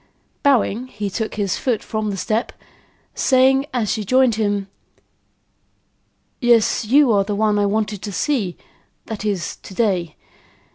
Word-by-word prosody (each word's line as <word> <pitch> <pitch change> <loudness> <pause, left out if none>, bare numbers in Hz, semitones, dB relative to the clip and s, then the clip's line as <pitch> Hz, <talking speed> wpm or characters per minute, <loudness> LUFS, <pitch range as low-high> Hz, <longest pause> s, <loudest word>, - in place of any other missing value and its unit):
Bowing, 255 -3 +2
he 205 -4 -5
took 220 +2 -3
his 200 -4 -1
foot 240 -5 -1
from 215 -1 -3
the 195 - -3
step, 220 +4 -1 0.6
saying, 265 +1 +3
as 235 -5 -1
she 215 - -2
joined 255 +3 +3
him: 205 -2 -1 1.7
"Yes, 235 -2 +3
you 270 +3 +4
are 200 -2 +3
the 205 +1 -3
one 210 0 +2
I 205 - +2
wanted 210 -1 -1
to 205 - -5
see; 205 -5 -1 0.5
that 220 -2 -6
is, 200 -5 -2
to 190 - -12
day. 180 -8 0
215 Hz, 145 wpm, -20 LUFS, 200-240 Hz, 1.7 s, you